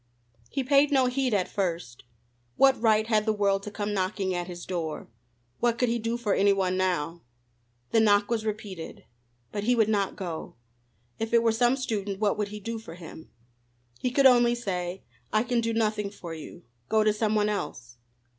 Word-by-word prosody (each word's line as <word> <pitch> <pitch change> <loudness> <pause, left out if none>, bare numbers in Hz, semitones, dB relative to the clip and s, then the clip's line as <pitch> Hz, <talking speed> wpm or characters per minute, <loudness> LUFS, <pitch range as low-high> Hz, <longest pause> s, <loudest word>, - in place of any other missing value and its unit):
He 270 - -2
paid 280 +2 +4
no 265 -2 +4
heed 255 0 0
at 190 -4 +1
first. 170 -13 -3 0.5
What 270 -3 +4
right 220 -2 +4
had 215 -1 +1
the - - +4
world 200 -2 +1
to 210 - -6
come 205 0 -3
knocking 190 0 -1
at 175 -1 -3
his 175 -1 -8
door? 165 -4 -4 0.5
What 235 -1 +1
could 245 0 +1
he 235 0 0
do 230 +1 -2
for 220 -4 0
any 200 0 +4
one 185 -2 0
now? 175 -3 -1 0.7
The 225 - +4
knock 205 -2 +4
was 225 -2 0
repeated. 205 -6 -6 0.5
But 205 -1 -3
he 245 +2 +3
would 220 -2 +3
not 200 -3 0
go. 175 -5 -6 0.6
If 225 +1 0
it 230 - +5
were 230 - +4
some 240 +3 +3
student, 210 -7 -3
what 210 -1 +2
could 210 -1 -1
he 210 +1 -7
do 225 +2 -5
for 165 -7 -10
him? 160 -2 -11 0.7
He 250 - 0
could 270 +2 +2
only 240 -2 +6
say: 185 -5 -4 0.3
"I 215 +1 +3
can 245 -1 0
do 230 0 -1
nothing 215 -2 0
for 175 -4 -8
you. 165 +2 -10 0.3
Go 220 0 +3
to 215 0 +3
some 215 0 0
one 210 -1 +2
else." 120 - -4
210 Hz, 195 wpm, -27 LUFS, 185-230 Hz, 0.7 s, only